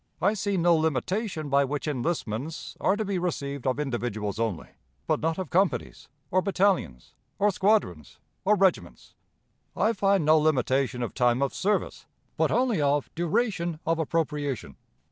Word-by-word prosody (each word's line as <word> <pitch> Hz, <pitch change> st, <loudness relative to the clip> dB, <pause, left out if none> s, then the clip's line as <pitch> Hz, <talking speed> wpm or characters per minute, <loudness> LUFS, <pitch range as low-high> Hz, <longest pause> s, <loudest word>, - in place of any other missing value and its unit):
I 200 Hz, +3 st, +2 dB
see 200 Hz, -1 st, -1 dB
no 170 Hz, 0 st, +4 dB
limitation 160 Hz, -, -1 dB
by 140 Hz, 0 st, +3 dB
which 145 Hz, +2 st, -3 dB
enlistments 145 Hz, -1 st, -3 dB
are 190 Hz, -, +3 dB
to 215 Hz, +1 st, -2 dB
be 195 Hz, -2 st, -1 dB
received 140 Hz, -6 st, -3 dB
of 130 Hz, +2 st, 0 dB
individuals 115 Hz, -7 st, -3 dB
only, 110 Hz, -8 st, -2 dB, 0.4 s
but -, -, +1 dB
not 160 Hz, 0 st, -1 dB
of 185 Hz, -5 st, -5 dB
companies, 190 Hz, -4 st, 0 dB, 0.2 s
or 185 Hz, -, +3 dB
battalions, 190 Hz, -, 0 dB, 0.2 s
or 205 Hz, +1 st, +3 dB
squadrons, 190 Hz, -, 0 dB, 0.3 s
or 210 Hz, +2 st, +4 dB
regiments. 190 Hz, -2 st, 0 dB, 0.6 s
I 225 Hz, -, +2 dB
find 195 Hz, -4 st, +2 dB
no 155 Hz, +1 st, +6 dB
limitation 135 Hz, -4 st, +1 dB
of 120 Hz, -, -4 dB
time 125 Hz, +1 st, +2 dB
of 140 Hz, -, -1 dB
service, 205 Hz, +2 st, -1 dB, 0.3 s
but -, -, +2 dB
only 245 Hz, -9 st, +1 dB
of 145 Hz, 0 st, 0 dB
duration 175 Hz, -1 st, -1 dB
of 165 Hz, 0 st, +1 dB
appropriation. 150 Hz, -, -2 dB
160 Hz, 150 wpm, -27 LUFS, 135-190 Hz, 0.6 s, no